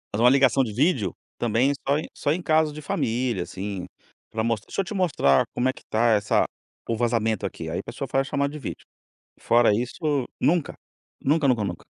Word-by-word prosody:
fazer 115 - +1
uma 125 - +8
ligação 135 0 +4
de 110 - -4
vídeo, 125 - +1 0.3
também, 120 +4 +2 0.2
só 140 +2 +3
em 155 - -3
só 145 - 0
em 180 - 0
caso 155 -2 +2
de 155 +1 -8
família, 120 -7 -1
assim, 95 +1 -5 0.4
para 110 0 -1
mos 115 -3 0
"Deixa - - -3
eu 195 - -5
te 210 - -6
mostrar 150 - +3
como 130 +1 +2
é - - -1
que - - -15
está 115 +2 +1
essa 105 -1 +3 0.4
o 115 - 0
vazamento 115 -2 0
aqui". - - -7
Aí - - -2
a - - -6
pessoa - - -6
faz 135 +1 0
a - - -8
chamada 140 0 0
de 150 - -6
vídeo. 135 - -7 0.5
Fora 120 -1 +4
isso, 135 - -1 0.2
nunca, 170 -1 +1 0.5
nunca, 145 0 +2
nunca, 120 -5 +2
nunca. 90 -3 -5
125 Hz, 210 wpm, -25 LUFS, 110-145 Hz, 0.5 s, uma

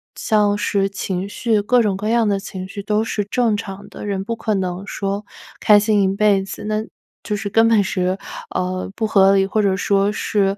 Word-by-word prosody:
像 210 -2 +2
是 200 -1 +1
情 190 -1 -3
绪， 220 +1 0
各 245 +4 +3
种 205 -4 0
各 210 +2 -3
样 230 -2 +2
的 200 -1 +1
情 190 -1 -7
绪 200 +1 -7
都 210 +1 +1
是 210 -2 -2
正 225 0 +1
常 200 -1 -8
的， - - -9
人 195 -2 -2
不 230 +3 -3
可 220 -1 -2
能 185 0 -3
说 200 +1 -3 0.3
开 210 -1 +6
心 205 -1 +2
一 - - +3
辈 200 -2 +3
子， 195 +2 -8
那 215 0 -1 0.4
就 210 - -2
是 205 0 -4
根 225 +2 +4
本 225 -3 +4
是， 185 0 -1 0.4
呃， 185 +1 -2
不 225 - -1
合 195 -2 +5
理， 195 0 +3
或 215 +2 0
者 195 -2 +1
说 200 +2 +2
是， 200 -2 0
205 Hz, 225 characters per minute, -20 LUFS, 195-215 Hz, 0.4 s, 开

